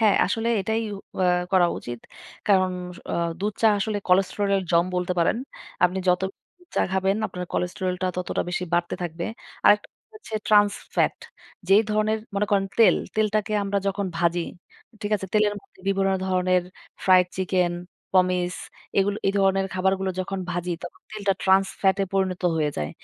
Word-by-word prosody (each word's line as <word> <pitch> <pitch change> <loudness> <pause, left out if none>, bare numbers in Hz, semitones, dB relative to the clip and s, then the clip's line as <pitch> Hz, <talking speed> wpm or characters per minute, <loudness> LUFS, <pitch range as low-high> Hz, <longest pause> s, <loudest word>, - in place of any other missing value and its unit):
হ্যাঁ, 215 -3 +5
আসলে 225 +4 -1
এটাই 220 +4 -1
উ - - -6 0.2
অ্যা 185 - +3 0.3
করা 185 -2 +5
উচিত। 120 0 -7 0.5
কারণস 185 -2 +1 0.2
অ - - -2 0.3
দুধ-চা 210 +2 +2
আসলে 205 +1 -1
কোলেস্টেরল 195 +2 +2
এর 195 - 0
জম 170 0 +4
বলতে 180 0 0
পারেন। 170 - +3 0.5
আপনি 180 +1 +1
যত 180 0 +4 0.4
দু - - -20
চা - - +2
খাবেন, 190 +1 +1
আপনার 180 -3 -6
কোলেস্টেরল 180 +1 -1
টা - - +2
ততটা 180 - -1
বেশি 180 0 -2
বাড়তে 175 0 0
থাকবে। 170 0 -4 0.4
আরেকটা 205 0 +5 0.3
হচ্ছে 420 - -9
ট্রান্স 205 -1 +5 0.2
ফ্যাট। - - +2 0.5
যেই 200 +3 +6
ধরনের 215 +1 +1 0.2
মনে 205 +1 +1
করেন 195 -1 +2
তেল। 225 - +7 0.2
তেলটাকে 215 0 +1
আমরা 200 0 0
যখন 195 0 -1
ভাজি, 170 +1 +1 0.6
ঠিক 205 - -3
আছে? 195 - -6
তেলের 210 -1 +3
মধ্যে - - -24
বিভিন্ন 195 0 +2 0.2
ধরনের 185 -1 +2 0.4
ফ্রাইড 185 -1 +6
চিকেন, 185 -1 +1 0.4
পমিছ 180 -1 +2 0.4
এইগুলো, 200 +1 +2
এই 195 - +3
ধরনের 195 0 +3
খাবারগুলো 190 +1 +1
যখন 195 +1 -3
ভাজি, 175 0 -2
তখন 175 - -9
তেলটা 205 -2 0
ট্রান্স 190 0 +4
ফ্যাট 190 -1 +3
এ - - +2
পরিণত 190 -2 0
হয়ে 150 -2 +1
যায়। 75 0 -2
190 Hz, 165 wpm, -24 LUFS, 180-205 Hz, 0.6 s, তেল